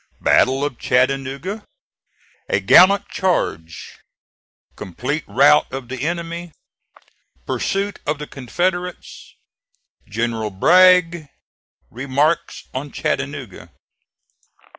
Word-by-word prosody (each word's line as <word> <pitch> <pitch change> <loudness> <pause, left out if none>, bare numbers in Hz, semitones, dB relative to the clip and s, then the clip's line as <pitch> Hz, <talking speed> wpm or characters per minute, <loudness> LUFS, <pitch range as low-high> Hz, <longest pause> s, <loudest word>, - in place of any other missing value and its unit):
BATTLE 135 +2 +2
OF 140 -5 -5
CHATTANOOGA 135 - -1 0.9
A - - +1
GALLANT 200 +2 +5
CHARGE 85 - -3 0.8
COMPLETE - - -4
ROUT - - +4
OF 130 -2 -7
THE 130 -1 -6
ENEMY 170 +1 -4 0.9
PURSUIT 200 +1 -2
OF 150 +1 0
THE 150 - -7
CONFEDERATES 175 +7 -4 0.7
GENERAL 115 0 -2
BRAGG 170 - +4 0.6
REMARKS 140 +6 -1
ON 135 +2 -5
CHATTANOOGA. 140 -7 -4
145 Hz, 80 wpm, -20 LUFS, 130-175 Hz, 0.9 s, GALLANT